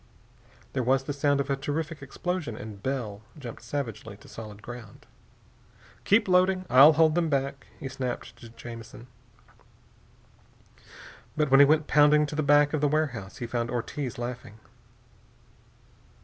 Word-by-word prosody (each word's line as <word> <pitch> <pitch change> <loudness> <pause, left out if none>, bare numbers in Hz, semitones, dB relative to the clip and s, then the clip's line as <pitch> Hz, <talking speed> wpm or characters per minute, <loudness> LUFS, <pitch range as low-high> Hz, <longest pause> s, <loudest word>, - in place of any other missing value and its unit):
There 130 - 0
was 130 +2 +2
the 145 - -4
sound 140 0 +1
of 140 - -1
a - - +2
terrific 150 +3 -4
explosion, 155 -2 -4
and 105 -2 -9
Bell 115 -6 -3 0.2
jumped 120 -7 -9
savagely 115 -4 -5
to - - -17
solid 105 -2 -10
ground. 120 -4 -10 1.0
"Keep 210 +2 +4
loading! 185 0 +3
I'll 140 +5 +9
hold 160 0 +4
them 170 -1 +1
back!" 140 -1 -2
he - - -5
snapped 130 -2 -5
to 120 - -12
Jamison. 115 0 -10 2.3
But 150 -3 +1
when 135 - +7
he 140 - +8
went 155 +1 +3
pounding 150 0 +5
to 150 - -6
the 155 - 0
back 145 0 +4
of 155 - 0
the 150 - +3
warehouse 140 -10 -2
he 120 - -4
found 120 0 -2
Ortiz 125 +2 -4
laughing. 120 -3 -6
135 Hz, 150 wpm, -27 LUFS, 120-150 Hz, 2.3 s, I'll